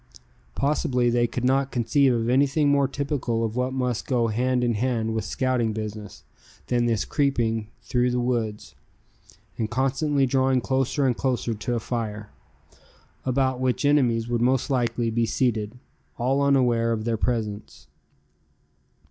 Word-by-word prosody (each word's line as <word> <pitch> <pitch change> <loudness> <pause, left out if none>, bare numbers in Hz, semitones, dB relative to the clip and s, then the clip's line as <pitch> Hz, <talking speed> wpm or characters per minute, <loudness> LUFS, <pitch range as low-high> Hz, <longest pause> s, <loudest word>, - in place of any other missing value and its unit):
Possibly 135 -4 +1
they 120 0 +2
could 125 +1 -3
not 135 +1 +2
conceive 130 +3 +2
of 115 -1 0
anything 140 +4 +3
more 140 -1 +3
typical 135 -5 -2
of 110 0 -4
what 125 +1 0
must 125 -3 -2
go 120 -4 +1
hand 125 +3 0
in 120 -1 +1
hand 115 0 -1
with 110 -2 -2
scouting 125 -2 0
business, 105 -2 -7 0.4
than 120 -1 +1
this 115 -3 0
creeping 115 -6 0 0.2
through 125 0 +1
the 125 0 0
woods, 115 -4 -2 0.9
and 110 -1 -1
constantly 135 +3 +1
drawing 130 0 +2
closer 135 +3 0
and 125 -2 +2
closer 125 -3 -1
to 115 +3 -3
a - - 0
fire, 105 -3 -4 0.9
about 130 0 +1
which 130 +2 0
enemies 120 -6 +2
would 120 -1 -1
most 130 +3 +1
likely 120 -2 0
be 115 0 +1
seated, 115 -2 -1 0.4
all 130 +3 +1
unaware 120 -5 +2
of 110 -1 -3
their 115 -1 0
presence. 110 -3 -3
125 Hz, 150 wpm, -25 LUFS, 115-130 Hz, 0.9 s, anything